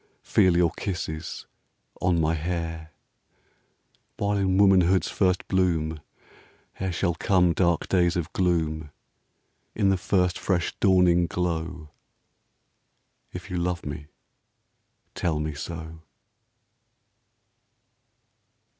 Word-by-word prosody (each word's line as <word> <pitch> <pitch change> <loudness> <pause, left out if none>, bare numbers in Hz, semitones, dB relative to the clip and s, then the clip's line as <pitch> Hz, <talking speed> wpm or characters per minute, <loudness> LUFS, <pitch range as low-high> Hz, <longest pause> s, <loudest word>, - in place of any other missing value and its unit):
Feel 90 -2 +3
your 85 -2 +3
kisses 85 -5 -5 0.6
on 90 -2 +2
my 80 0 +2
hair; 80 -1 -4 1.3
While 100 0 0
in 95 -1 +1
womanhood's 95 -2 +4
first 90 -2 +1
bloom, 80 -4 0 0.8
Ere 95 -1 -1
shall 85 0 0
come 90 0 +2
dark 85 -2 +1
days 90 -1 +2
of 85 -2 -3
gloom, 80 -4 0 0.9
In 100 -3 +2
the 95 - +2
first 90 -1 0
fresh 90 -3 0
dawning 90 -3 +4
glow, 85 -2 -3 0.7
— - - -48
If 90 +2 -9
you 90 - -2
love 85 0 -2
me, 75 0 -6 1.1
tell 85 -3 -1
me 75 0 -3
so. 80 +2 -7
85 Hz, 100 wpm, -25 LUFS, 80-90 Hz, 1.3 s, womanhood's